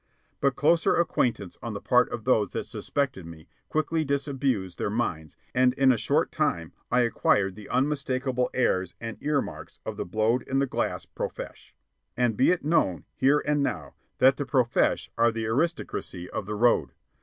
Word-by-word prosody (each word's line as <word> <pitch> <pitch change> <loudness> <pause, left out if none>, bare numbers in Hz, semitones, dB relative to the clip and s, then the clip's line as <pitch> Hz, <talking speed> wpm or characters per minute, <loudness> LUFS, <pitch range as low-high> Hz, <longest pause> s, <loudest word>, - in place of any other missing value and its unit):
But 140 -1 +1
closer 165 +3 +3
acquaintance 115 - 0
on 115 -2 -5
the - - -3
part 125 +3 +3
of 115 - -5
those 110 -6 +2
that - - -2
suspected 130 -9 -2
me 80 -1 -12 0.2
quickly 155 +1 0
disabused 135 - -1
their - - -1
minds, 85 - -3 0.2
and 125 0 +3
in 135 -1 +5
a - - +3
short - - +1
time 85 -1 -1 0.2
I 125 - +3
acquired 100 -5 +2
the 105 -1 -11
unmistakable 130 -2 0
airs 95 -8 0
and 115 0 -7
ear 145 -2 +1
marks - - -10
of - - -5
the - - -3
blowed 110 +6 +1
in 135 - 0
the 140 - +3
glass 130 - -2
profesh. - - -7 0.4
And 120 -3 +2
be 130 - +4
it 180 -4 +1
known, 95 - +1
here 140 +3 +3
and 145 -1 +1
now, 140 - -3 0.2
that 135 +1 +5
the 145 - -2
profesh 125 -4 +1
are 115 0 +5
the 115 0 -3
aristocracy 115 - -2
of 105 -2 -4
The 105 - -3
Road. 120 +3 +2
125 Hz, 180 wpm, -27 LUFS, 105-140 Hz, 0.4 s, in